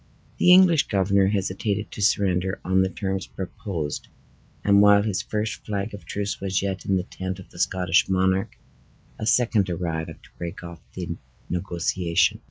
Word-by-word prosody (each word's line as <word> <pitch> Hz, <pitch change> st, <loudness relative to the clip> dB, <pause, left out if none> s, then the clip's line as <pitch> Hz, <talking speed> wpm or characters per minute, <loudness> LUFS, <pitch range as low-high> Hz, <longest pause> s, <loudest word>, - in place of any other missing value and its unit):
The 180 Hz, -, +6 dB
English 180 Hz, -4 st, +6 dB
governor 100 Hz, -1 st, +2 dB
hesitated 100 Hz, +1 st, -1 dB
to -, -, -7 dB
surrender 95 Hz, -2 st, +1 dB
on 95 Hz, +1 st, +3 dB
the 95 Hz, -, +1 dB
terms 95 Hz, -1 st, -3 dB
proposed, 90 Hz, -5 st, -5 dB, 0.6 s
and 100 Hz, 0 st, +5 dB
while 100 Hz, 0 st, +6 dB
his 105 Hz, -3 st, -1 dB
first 105 Hz, 0 st, -3 dB
flag 100 Hz, 0 st, -3 dB
of 100 Hz, -, -9 dB
truce 100 Hz, 0 st, -3 dB
was 95 Hz, -1 st, -1 dB
yet 95 Hz, -1 st, -3 dB
in 95 Hz, -, +2 dB
the 90 Hz, -, -1 dB
tent 95 Hz, -1 st, -5 dB
of 95 Hz, -, -13 dB
the 85 Hz, -, -13 dB
Scottish 90 Hz, 0 st, +2 dB
monarch, 95 Hz, 0 st, +1 dB, 0.6 s
a 110 Hz, -, -3 dB
second 115 Hz, -6 st, +3 dB
arrived 85 Hz, -2 st, -4 dB
to -, -, -17 dB
break 85 Hz, 0 st, -6 dB
off 85 Hz, -1 st, -9 dB, 0.2 s
the 85 Hz, -2 st, -4 dB, 0.3 s
negotiation. 85 Hz, -1 st, 0 dB
95 Hz, 165 wpm, -24 LUFS, 90-100 Hz, 0.6 s, The